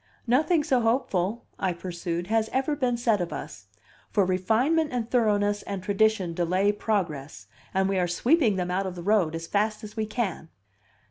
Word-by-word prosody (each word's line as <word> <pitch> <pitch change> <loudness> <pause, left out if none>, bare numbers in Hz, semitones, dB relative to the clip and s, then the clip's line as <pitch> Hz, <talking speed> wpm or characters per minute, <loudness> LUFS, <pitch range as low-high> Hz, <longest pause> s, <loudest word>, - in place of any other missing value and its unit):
"Nothing 300 +7 +3
so 260 -3 +2
hopeful," 225 -3 0
I 185 -2 0
pursued, 175 -1 -4
"has 220 +2 +1
ever 270 +3 0
been 250 -4 0
said 230 -5 +1
of 170 -2 -3
us. 100 -8 -7 0.4
For 200 - +2
refinement 230 - +1
and 240 -3 -2
thoroughness 205 -4 +2
and 195 -2 -5
tradition 200 -3 +1
delay 185 +4 +2
progress, 165 - -3 0.3
and 190 0 +1
we 195 -1 0
are 180 - +1
sweeping 235 - +2
them 180 -1 -2
out 190 +1 0
of 185 - -5
the 175 - -7
road 190 -5 +2
as 165 0 -5
fast 215 +4 0
as 210 0 -9
we 220 -1 -2
can." 210 -7 -3
205 Hz, 180 wpm, -26 LUFS, 180-230 Hz, 0.4 s, Nothing